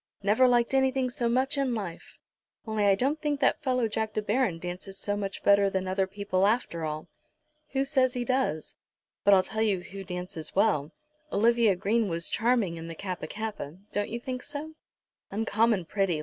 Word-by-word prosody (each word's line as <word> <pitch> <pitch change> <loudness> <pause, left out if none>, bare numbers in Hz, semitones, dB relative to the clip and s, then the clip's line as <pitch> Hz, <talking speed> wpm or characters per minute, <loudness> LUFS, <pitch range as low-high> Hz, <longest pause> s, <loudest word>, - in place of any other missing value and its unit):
"Never 215 +6 +5
liked 240 0 +3
anything 265 -1 +2
so 245 -3 0
much 265 +4 +1
in 260 -3 +1
life; 190 -6 -7 0.5
only 220 -2 0
I 200 -1 +5
don't 280 +8 0
think 295 -2 0
that 270 - +2
fellow 255 -3 +1
Jack 220 0 -2
De 215 - 0
Baron, 210 -4 +1
dances 180 +3 -7
so 205 +1 -1
much 200 -1 -4
better 200 0 +5
than 190 -1 -2
other 190 0 +1
people, 200 -1 0
after 210 -7 0
all?" 155 0 -4 0.7
"Who 270 0 +1
says 260 -2 +2
he 245 -1 -1
does? 255 - 0 0.5
But 200 0 +7
I'll 185 - +4
tell 220 +3 -3
you 205 -5 +2
who 195 +2 -8
dances 180 -3 -6
well. 190 -8 +2 0.4
Olivia 230 -1 +4
Green 210 +4 +1
was 165 0 -2
charming 225 -7 +1
in 165 0 -7
the 165 - -6
Kappa 185 -3 -5
kappa. 205 -6 -5
Don't 205 0 -1
you 235 - -3
think 255 +1 -5
so?" 295 +3 -6 0.6
"Uncommon 215 -1 +1
pretty." 190 -3 0
210 Hz, 185 wpm, -28 LUFS, 185-245 Hz, 0.7 s, But